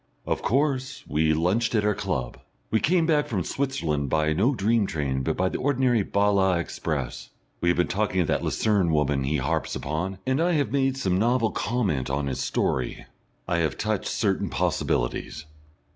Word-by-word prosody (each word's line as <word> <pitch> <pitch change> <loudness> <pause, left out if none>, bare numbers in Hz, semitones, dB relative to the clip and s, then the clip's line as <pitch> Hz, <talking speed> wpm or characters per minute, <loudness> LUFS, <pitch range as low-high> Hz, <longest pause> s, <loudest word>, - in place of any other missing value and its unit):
Of - - -1
course 135 0 0
we 80 +1 +2
lunched 95 +9 +1
at 105 -1 +2
our 105 - +3
club. 90 - -3 0.3
We 110 - +3
came 170 +5 +2
back 150 -2 +2
from 95 -6 -1
Switzerland 80 - -1
by 75 +1 +2
no 115 - +2
dream 110 0 +2
train 70 -5 -2
but - - -1
by 95 - +2
the - - -3
ordinary 130 -4 +2
Bale 100 -1 +2
express. 75 -5 -3 0.3
We 85 - +2
have 85 - +2
been 90 - +3
talking 95 -1 0
of - - +1
that - - 0
Lucerne 100 -6 +1
woman 75 -3 +1
he 75 +3 0
harps 65 -1 -1
upon, 85 +7 -3
and 130 +4 +1
I 175 +1 +2
have 145 -3 +1
made 135 -1 +1
some 95 -7 0
novel 115 0 +2
comment 100 - -1
on 70 +1 -1
his 65 -1 -3
story. 65 -1 -1 0.4
I 85 - +1
have 80 -2 0
touched 110 -1 -1
certain 105 -3 0
possibilities. 65 +5 -1
95 Hz, 180 wpm, -25 LUFS, 75-120 Hz, 0.4 s, our